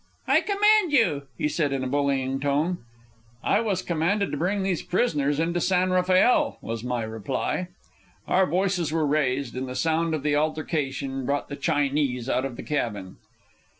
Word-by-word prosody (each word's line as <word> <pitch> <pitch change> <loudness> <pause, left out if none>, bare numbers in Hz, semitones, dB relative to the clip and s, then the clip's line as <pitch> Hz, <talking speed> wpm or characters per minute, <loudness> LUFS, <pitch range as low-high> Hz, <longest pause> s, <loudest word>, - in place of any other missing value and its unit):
"I - - +4
command 420 -3 +3
you," 165 - +2
he - - 0
said 150 -1 0
in 135 -1 -1
a - - -2
bullying 135 -1 0
tone. 145 +6 0 0.6
"I - - +3
was 200 -5 -1
commanded 180 +5 0
to - - -2
bring 190 +5 0
these 190 -3 0
prisoners 150 - 0
into 170 +2 0
San 185 0 +2
Rafael," 185 - +3
was 115 0 -5
my 125 -2 -2
reply. 110 - -3 0.6
Our 185 0 +3
voices 180 -2 0
were 160 -1 +1
raised, 140 -4 0
and 130 0 -4
the 125 - -6
sound 160 +1 +1
of 150 - -5
the 150 -1 +1
altercation 145 -3 -2
brought 145 0 -1
the 140 - -4
Chinese 140 -3 0
out 130 0 0
of 135 -3 -5
the - - -8
cabin. 105 -10 -3
150 Hz, 170 wpm, -25 LUFS, 135-180 Hz, 0.6 s, I